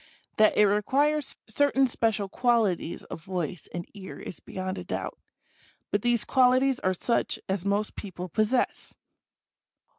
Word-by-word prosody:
That 215 0 +5
it 210 - +7
requires 275 +9 +1
certain 270 +3 +3
special 225 -5 0
qualities 215 -6 +1
of 160 - -9
voice 180 -3 -4
and 175 0 -5
ear 195 -2 -9
is 180 - -7
beyond 185 0 -5
a - - -6
doubt; - - -4 0.7
but 205 - +1
these 240 -1 +1
qualities 255 0 +4
are 185 0 0
such 235 +6 0
as 190 -1 -2
most 205 +1 0
people 185 -3 -6
possess. 215 +8 0
210 Hz, 140 wpm, -27 LUFS, 185-250 Hz, 0.7 s, it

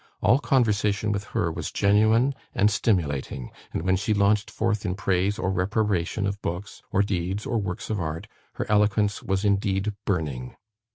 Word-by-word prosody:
All 125 +6 +4
conversation 105 -6 +1
with 100 0 -2
her 95 -8 -1
was 80 -1 -5
genuine 110 +6 +3 0.2
and 105 +2 +4
stimulating; 70 - -1 0.2
and - - -3
when 95 +1 +3
she 105 +3 0
launched 100 +1 +2
forth 110 -2 -1
in 90 -3 -1
praise 95 +1 0
or 95 - -1
reprobation 100 0 0
of 100 +1 -3
books, 90 +3 -5
or 100 - +3
deeds, 95 +1 -2
or 115 - 0
works 95 +1 -4
of 105 - -1
art, 80 +5 -4 0.3
her - - -3
eloquence 105 0 +2
was 95 +1 -1
indeed 100 0 +1
burning. 75 -10 -2
100 Hz, 165 wpm, -25 LUFS, 90-105 Hz, 0.3 s, All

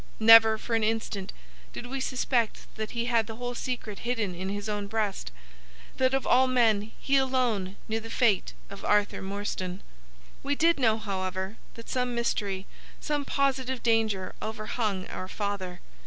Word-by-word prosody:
Never 225 0 +8
for 230 - -5
an 225 -1 +2
instant 215 -3 -1 0.4
did - - -6
we 265 +2 -4
suspect 250 -3 0
that 220 -1 -4
he 235 -1 -2
had 230 -3 +2
the 225 - -6
whole 245 +1 -4
secret 240 -4 -4
hidden 225 -6 -1
in 185 +2 -4
his 205 +1 -4
own 205 -1 -2
breast,—that - - -3
of 270 - -1
all 260 +1 +5
men 220 -4 +2
he 275 0 +2
alone 245 -8 +1
knew 220 +1 -1
the 225 0 -9
fate 225 -5 +2 0.2
of 200 - -9
Arthur 205 0 +2
Morstan. 190 -1 -4 0.6
"We 285 +1 0
did 330 +1 +3
know, 225 -4 +3
however, 190 -1 -3 0.2
that 230 - -11
some 250 -1 -1
mystery—some 235 +6 -3
positive 265 -2 0
danger—overhung 215 -1 -1
our 185 - -6
father. 190 -3 -4
220 Hz, 150 wpm, -28 LUFS, 200-245 Hz, 0.6 s, Never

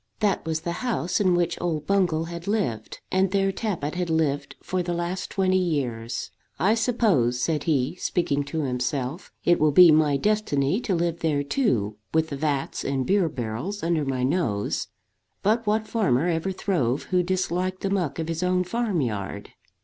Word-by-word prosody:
That 205 -3 +1
was 160 0 -1
the 170 - -3
house 230 -8 0
in 185 -3 +3
which 175 -1 0
old 160 -4 -1
Bungall 180 -5 +2
had 170 +1 -7
lived, 185 - -2
and 190 0 +2
there 195 0 +1
Tappitt 185 -9 -3
had 180 -1 -2
lived 155 -3 0
for 185 0 -1
the 175 0 -2
last 175 +2 -3
twenty 185 -1 +2
years. 130 -10 -2 0.3
"I 195 +6 +3
suppose," 215 - +2
said 150 +2 0
he, 150 -1 +1
speaking 145 -6 0
to 155 +3 -3
himself, 130 +4 -2
"it 175 - +4
will 155 0 +4
be 175 +3 +8
my 150 -2 +4
destiny 195 -5 +1
to 195 -6 0
live 170 0 -1
there 150 -4 0
too, 120 - 0 0.2
with 160 0 +2
the 140 - -4
vats 140 -1 -2
and 135 -2 -1
beer 190 -1 +2
barrels 130 - -4
under 165 -2 +1
my 130 -2 -1
nose. 130 - 0 0.6
But 220 +2 +1
what 215 +1 +1
farmer 170 - +1
ever 170 +2 0
throve 150 - 0
who 180 -1 +4
disliked 185 0 -1
the 195 - -1
muck 175 -8 -1
of 160 -1 -3
his 165 0 -3
own 180 0 +2
farm 210 -2 -1
yard?" 100 -4 -4
170 Hz, 180 wpm, -25 LUFS, 140-185 Hz, 0.6 s, be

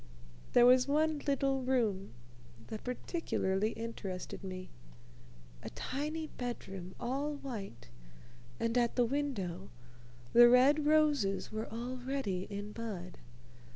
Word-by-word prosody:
There 240 - +7
was 255 +1 +6
one 305 +1 +2
little 275 -1 +1
room 220 - 0 0.5
that 215 - -6
particularly 220 - -1
interested 205 -5 -6
me, 185 -1 -6 0.9
a - - -6
tiny 305 +4 -3
bedroom 195 - -6
all 275 +5 -2
white, 210 - -7 0.7
and 230 +1 0
at 235 -1 +1
the 245 - +4
window 225 -10 -2 0.6
the 240 0 +9
red 280 +5 +5
roses 295 -10 +3
were 215 +1 -4
already 245 -4 -3
in 205 0 -5
bud. 200 -6 -6
240 Hz, 110 wpm, -33 LUFS, 195-275 Hz, 0.9 s, the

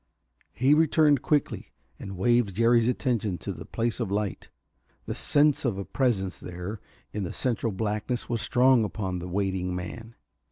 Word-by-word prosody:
He 130 - +3
returned 150 -3 +4
quickly 150 -1 -1 0.3
and 95 -1 -7
waved 120 -1 +2
Jerry's 115 +1 +4
attention 115 -7 0
to - - -5
the - - -10
place 115 +1 -2
of 115 -5 -2
light. 100 -2 -3 0.6
The - - -3
sense 145 0 +2
of 120 -7 0
a 100 - -4
presence 105 -9 -1
there 90 +4 -7 0.3
in 105 - -3
the 90 - -4
central 115 -3 -1
blackness 105 +4 -2
was 115 -2 -1
strong 125 -1 +4
upon 95 -4 -3
the 90 +1 -6
waiting 95 -1 -1
man. 115 +6 -7
110 Hz, 160 wpm, -27 LUFS, 95-125 Hz, 0.6 s, returned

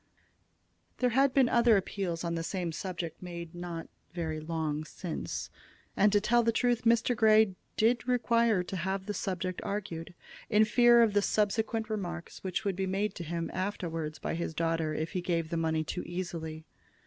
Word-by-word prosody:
There 250 -1 +2
had 270 +3 +4
been 265 -1 +4
other 235 -2 +5
appeals 180 -3 -2
on 170 -1 -1
the 165 - -1
same 175 0 -2
subject 175 -1 -5
made 170 -2 -7
not 175 -1 -6 0.3
very 160 -3 -2
long 155 -1 -2
since, 150 - -5 0.4
and, 205 +1 +4
to 205 - +4
tell 240 +3 +3
the 230 0 +2
truth, 240 0 +1
Mr. 235 +1 +3
Grey 215 -2 +5 0.2
did 230 +2 +2
require 235 -5 +3
to 190 +1 -5
have 190 +2 -2
the 210 - -3
subject 185 -1 -3
argued, 175 -5 -4 0.3
in 215 0 +5
fear 240 +1 +6
of 220 -3 +2
the 205 - +4
subsequent 220 +2 0
remarks 175 -6 -5
which 185 +2 -2
would 195 -2 0
be 190 +1 -1
made 195 +2 0
to 175 - -6
him 170 +1 -3
afterward 165 -5 -3
by - - -1
his 165 -1 -3
daughter 165 -1 0
if 160 +2 -2
he 185 - -2
gave 165 -2 -1
the - - 0
money 160 -1 +1
too 180 +3 -4
easily. 165 -3 -5
185 Hz, 180 wpm, -30 LUFS, 165-220 Hz, 0.4 s, fear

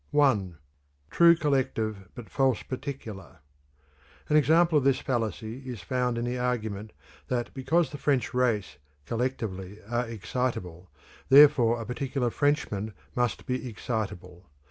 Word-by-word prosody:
I. 105 -11 +3 0.6
True 170 0 +7
Collective 110 - -1
but 120 -3 -9
False 135 -4 +1
Particular. 130 - -7 0.9
An 150 - +3
example 160 +1 +5
of - - -4
this 135 -1 +3
fallacy 115 -1 -3
is 125 -6 -7
found 125 +2 -1
in 120 - -2
the 125 +1 -2
argument 110 -4 -2 0.4
that 120 -2 -2
because 150 +5 +1
the 145 - -7
French 135 -2 0
race, 115 -10 0 0.3
collectively, 110 -6 -3
are 120 +1 -1
excitable, 100 -6 -4 0.4
therefore 135 -5 +7
a 115 - -5
particular 125 0 -2
Frenchman 110 -8 -1 0.2
must 125 -1 -1
be 125 0 -3
excitable. 95 -6 -5
125 Hz, 125 wpm, -27 LUFS, 110-135 Hz, 0.9 s, True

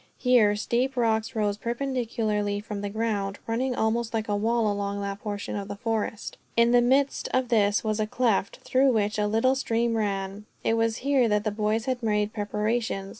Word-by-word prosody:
Here 235 -5 +4
steep 250 +5 -1
rocks 225 -2 +1
rose 210 -2 0
perpendicularly 230 -4 -1
from 205 -1 -6
the 205 - -3
ground, 205 -2 -2
running 250 +3 -1
almost 230 +1 0
like 220 0 -1
a 205 - 0
wall 225 +2 +1
along 200 -1 -2
that 200 0 -4
portion 205 -2 -4
of 200 -1 -4
the 205 - -5
forest. 220 -1 -3 0.2
In 235 0 +5
the 245 0 +5
midst 270 +3 +2
of 255 -1 0
this 205 -3 +3
was 215 -1 -1
a 215 - 0
cleft, 215 -4 0
through 265 +1 +3
which 210 -1 0
a 210 - +2
little 225 +5 +2
stream 235 -3 0
ran. 200 -1 -2 0.2
It - - +2
was 225 0 +1
here 275 -4 +3
that 210 -1 +1
the 215 - -1
boys 215 +2 -1
had 255 -1 -2
made 210 -2 0
preparations. 210 -1 -2
220 Hz, 190 wpm, -26 LUFS, 205-235 Hz, 0.2 s, In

